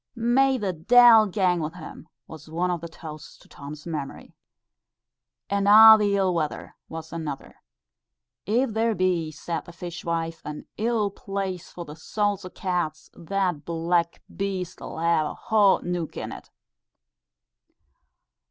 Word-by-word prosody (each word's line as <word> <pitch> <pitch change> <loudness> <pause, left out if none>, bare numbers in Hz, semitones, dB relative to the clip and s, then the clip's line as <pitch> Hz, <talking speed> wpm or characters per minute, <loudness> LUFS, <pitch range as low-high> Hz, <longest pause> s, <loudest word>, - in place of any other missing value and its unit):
"May 260 +3 +2
the 200 -5 -2
deil 225 +5 +6
gang 185 -3 +1
wi' 160 +2 -5
him," 160 -1 -10 0.2
was 155 -1 -12
one 175 +3 -1
of 175 -2 -3
the 170 - -6
toasts 155 -2 -11
to - - -21
Tom's 145 +2 -10
memory. 150 -5 -6 1.1
"And 200 0 0
a' 220 +1 +10
the 205 -2 +1
ill 190 -2 +1
weather," 155 -3 -3
was 160 0 -8
another. 155 -4 -6 0.9
"If 235 +4 +1
there 225 0 +1
be," 180 -4 0
said 160 +1 -5
the - - -11
fishwife, 170 -1 -4
"an 150 0 -7
ill 220 -2 0
place 195 -3 -5
for 175 - -8
the 150 - -10
souls 205 +4 -2
o' 185 - -7
cats, 175 -5 -3
that 180 -3 -2
black 170 +1 -1
beast 190 -3 -4
'll - - -7
hae 170 0 +2
a 155 - -3
hot 210 -4 +3
neuk 175 -3 -3
in't." - - -7
180 Hz, 145 wpm, -25 LUFS, 160-200 Hz, 1.1 s, a